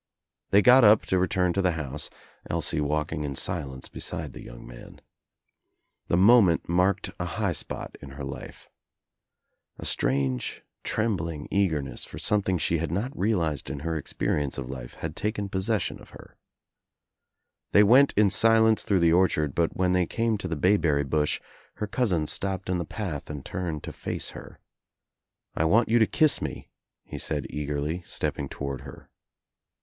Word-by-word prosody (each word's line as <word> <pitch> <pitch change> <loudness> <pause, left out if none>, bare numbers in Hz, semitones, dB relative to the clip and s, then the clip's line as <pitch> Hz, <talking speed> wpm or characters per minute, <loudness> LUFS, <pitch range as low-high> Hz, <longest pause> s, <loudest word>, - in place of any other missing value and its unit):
They 100 +1 +5
got 125 +1 +7
up 105 0 +7
to 95 - +1
return 90 -1 +1
to 100 - +1
the 90 -2 +2
house, 75 -2 -3 0.4
Elsie - - 0
walking 75 +1 -1
1 70 -2 -3
silence 70 -5 -3
beside - - -4
the - - -9
young - - -11
man. - - -12 1.1
The 85 - +2
moment 100 -3 +5
marked 90 +3 +1
I 90 - -2
high 100 +2 -1
spot 80 - -4
in 70 - -9
her 70 0 -7
life. 70 0 -8 1.1
A - - -8
strange 65 0 0 0.2
trembling 85 -9 -2
eager 90 -8 +1
ness 70 - -7
for - - -9
something 95 -3 0
she 85 +1 +1
had 80 -1 -3
not 110 +10 -2
realized 85 -8 0
in 70 - -5
her 80 0 -2
expe - - -5
dience 70 -2 0
of 65 -1 -5
life 65 -2 -8
had - - -6
taken 105 -1 -2
possession 95 +1 -1
of - - -15
her. - - -14 1.4
They 105 - +7
went 130 +7 +6
* - - -36
in 105 -2 +5
silence 110 +1 +5
through 95 -3 +1
the 85 -1 +4
orchard 80 -6 +2
but 85 -1 0
when 90 -1 +2
they 90 -2 +2
came 115 -1 0
to 95 - -4
the 80 - -2
bayberry 80 -4 +2
bush 75 +2 0 0.4
her 105 - -3
cousin 100 -8 0
stopped 95 +3 -2
in 90 - 0
the 85 - -3
path 80 -3 -5
and 75 -3 -6
turned 85 -5 -4
to - - -7
face - - -4
her. - - -11 1.0
"I 80 - +1
want 110 +8 +3
you 120 +1 +4
to 110 - +4
kiss 155 -3 +3
me," - - -5 0.4
he - - -7
said 75 -3 -1
eagerly, 75 +3 -3
stepping 70 - -2
toward 70 -2 -5
her. - - -12
85 Hz, 175 wpm, -26 LUFS, 75-100 Hz, 1.4 s, got